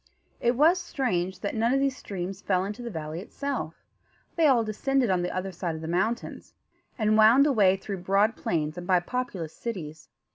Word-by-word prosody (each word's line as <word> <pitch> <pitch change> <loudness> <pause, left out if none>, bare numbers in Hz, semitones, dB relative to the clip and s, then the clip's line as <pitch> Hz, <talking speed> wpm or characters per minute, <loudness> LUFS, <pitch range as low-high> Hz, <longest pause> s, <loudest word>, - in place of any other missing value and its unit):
It 240 +1 +2
was 325 +7 +4
strange 190 - -2
that 200 - -2
none 230 +3 +1
of - - +2
these 275 -1 +1
streams 190 -3 -6
fell 185 -2 +1
into 210 +4 -6
the 240 - -5
valley 160 -4 -5
itself. 250 - -5 0.5
They 330 -2 +4
all 250 -5 +4
descended 240 +2 0
on 180 -1 +2
the 175 - -1
other 185 +1 -3
side 175 -2 -4
of 160 - -7
the 160 - -5
mountains, 190 +8 -2 0.4
and 215 -2 +2
wound 235 +6 +7
away 205 -9 +4
through 195 0 -5
broad 200 +5 +2
plains 155 0 -2
and 175 - -8
by 185 -2 +4
populous 185 -6 -4
cities. 160 -9 -7
200 Hz, 190 wpm, -27 LUFS, 175-240 Hz, 0.5 s, wound